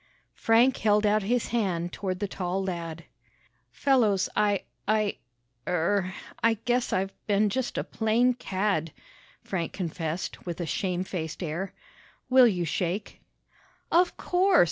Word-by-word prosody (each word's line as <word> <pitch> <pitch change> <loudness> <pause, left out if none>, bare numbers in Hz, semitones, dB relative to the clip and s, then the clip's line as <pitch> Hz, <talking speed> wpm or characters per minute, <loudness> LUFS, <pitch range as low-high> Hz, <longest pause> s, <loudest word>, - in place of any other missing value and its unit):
Frank 235 +3 +4
held 210 0 +3
out 210 +1 +3
his 235 +4 0
hand 180 -7 -1
toward 185 -2 -3
the 205 - -1
tall 190 0 -2
lad. 165 -3 -4 0.7
"Fellows, 225 -9 +2
I 205 -2 +2 0.2
I 215 -1 +1 0.5
er 180 +2 +1 0.3
I 230 0 +4
guess 245 0 +1
I've 195 +1 0
been 205 0 +3
just 255 +4 -2
a - - 0
plain 230 +3 +2
cad," 195 -8 -1 0.5
Frank 170 -4 -3
confessed 165 -2 -4
with 175 -1 -5
a 175 - -2
shame 180 +2 -1
faced 170 -2 -5
air. 175 +4 -3 0.6
"Will 255 -1 +8
you 180 -6 0
shake?" 180 +5 -3 0.7
"Of 350 +1 +3
course!" 370 +1 +3
195 Hz, 135 wpm, -27 LUFS, 180-225 Hz, 0.7 s, Will